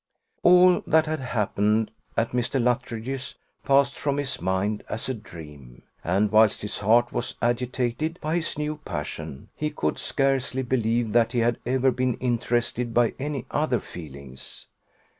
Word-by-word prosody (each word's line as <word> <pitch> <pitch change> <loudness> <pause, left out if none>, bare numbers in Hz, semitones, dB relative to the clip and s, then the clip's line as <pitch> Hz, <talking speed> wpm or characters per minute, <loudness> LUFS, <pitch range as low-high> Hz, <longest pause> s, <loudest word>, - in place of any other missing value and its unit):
All 180 0 +6
that 160 0 +4
had 155 0 -2
happened 110 -3 0 0.3
at 115 0 +2
Mr. 125 +2 0
Luttridge's 125 +1 -2 0.3
passed 140 0 +3
from 140 -1 0
his 140 - -2
mind 95 +4 -1
as 110 - -3
a 130 - -1
dream; 75 - -12 0.2
and 100 +4 +1
whilst 110 -1 +4
his 105 - -3
heart 115 +4 +3
was 120 - -2
agitated 125 +6 -1
by 155 +3 -1
his 170 -3 -2
new 150 0 -2
passion, 75 - -6
he 150 - -1
could 150 - -2
scarcely 135 -1 0
believe 120 -2 0
that 115 +1 +3
he 120 - +1
had 120 +1 +1
ever 130 +1 +3
been 125 -1 0
interested 120 -1 -1
by 120 -2 +3
any 140 -2 -3
other 150 -5 +1
feelings. 70 -5 -9
120 Hz, 150 wpm, -25 LUFS, 110-135 Hz, 0.3 s, All